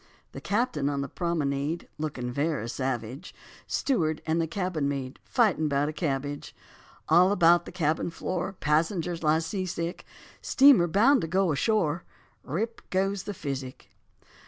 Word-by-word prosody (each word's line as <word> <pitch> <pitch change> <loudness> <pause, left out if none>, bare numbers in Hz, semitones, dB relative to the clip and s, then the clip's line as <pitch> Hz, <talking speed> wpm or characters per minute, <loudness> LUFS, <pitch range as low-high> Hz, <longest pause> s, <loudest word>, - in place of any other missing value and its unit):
The - - -8
captain 200 - 0
on 140 -1 -1
the 140 - -3
promenade 155 -1 -2
Looking 130 -5 -3
very 140 -3 -1
savage; 130 +4 -4 0.3
Steward 160 - 0
and 160 +1 +1
the 165 - -1
cabin 170 -5 -1
maid 135 -2 -4
Fightin' 205 -11 +2
'bout 140 0 +1
the 155 - -3
cabbage; 145 -3 -3 0.5
All 180 +4 +5
about 175 -3 +5
the - - -7
cabin 160 -2 0
floor 180 +3 -3
Passengers 165 +1 0
lie 155 0 +3
sea 185 +4 -3
sick; 170 0 -4 0.4
Steamer 265 -10 +6
bound 230 - +4
to 165 - -2
go 185 +1 +2
ashore, 170 +1 +1 0.4
Rip, 215 - -3
goes 195 +1 0
the 205 - -5
physic. 135 -3 -6
165 Hz, 145 wpm, -27 LUFS, 145-185 Hz, 0.5 s, Steamer